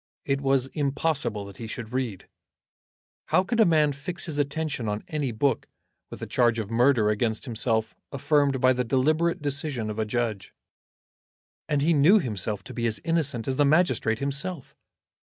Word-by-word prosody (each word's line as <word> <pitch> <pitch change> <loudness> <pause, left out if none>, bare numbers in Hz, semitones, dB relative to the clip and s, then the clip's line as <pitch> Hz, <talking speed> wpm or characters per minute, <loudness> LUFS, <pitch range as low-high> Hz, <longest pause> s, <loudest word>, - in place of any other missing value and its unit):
It 135 0 0
was 135 -2 +2
impossible 140 -7 -1
that 100 -1 -11
he 115 - -7
should 120 0 -7
read. 125 -7 -3 1.0
How 185 - +3
could 230 +4 -2
a 220 - +6
man 155 -3 +3
fix 145 +6 -5
his 150 -3 -4
attention 145 -5 -2
on 105 +1 -3
any 150 -6 -2
book, 120 +2 0 0.4
with - - -8
a - - -2
charge 120 -2 +2
of 110 -1 -4
murder 120 -2 +3
against 110 +2 -1
himself 115 -2 -1 0.2
affirmed 140 -1 +1
by 130 +1 +4
the 125 0 -1
deliberate 155 +7 +1
decision 140 -6 -1
of 105 - -6
a 110 - +1
judge? 110 -3 -3 1.1
And 145 -2 +1
he 165 +3 +3
knew 160 +8 +6
himself 105 - -2
to 130 - -10
be 120 -1 -1
as 110 -3 -1
innocent 155 -8 -1
as 130 -1 -1
the 145 - +4
magistrate 140 -7 +2
himself. 140 +4 -3
130 Hz, 170 wpm, -26 LUFS, 115-150 Hz, 1.1 s, a